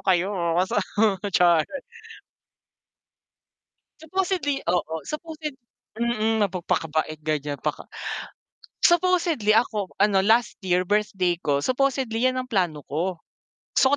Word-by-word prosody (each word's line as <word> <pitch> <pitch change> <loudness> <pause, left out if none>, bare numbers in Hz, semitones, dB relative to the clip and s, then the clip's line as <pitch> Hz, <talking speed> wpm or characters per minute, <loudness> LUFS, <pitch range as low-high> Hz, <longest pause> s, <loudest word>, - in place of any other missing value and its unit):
kayo." 190 0 +2 0.4
sa 200 - 0 0.5
char. 170 -4 +4 2.3
Supposedly, 320 -4 -1
oo, 175 -3 0
supposed 315 +1 -7 0.6
mm, 225 -2 +1
napagpakabait 160 -4 -1
ganyan 150 -2 -2
paka - - -4 1.0
supposedly 345 - +2
ako 215 -3 +2
ano 200 -1 +4
last 225 +3 +3
year 180 -1 +1
birthday 205 -3 +1
ko, 145 -2 +1
supposedly 255 - 0
yan 255 - -3
ang 255 - -3
plano 175 - -1
ko. 170 +5 -2 0.5
Gusto 275 +2 +4
210 Hz, 100 wpm, -24 LUFS, 175-265 Hz, 2.3 s, char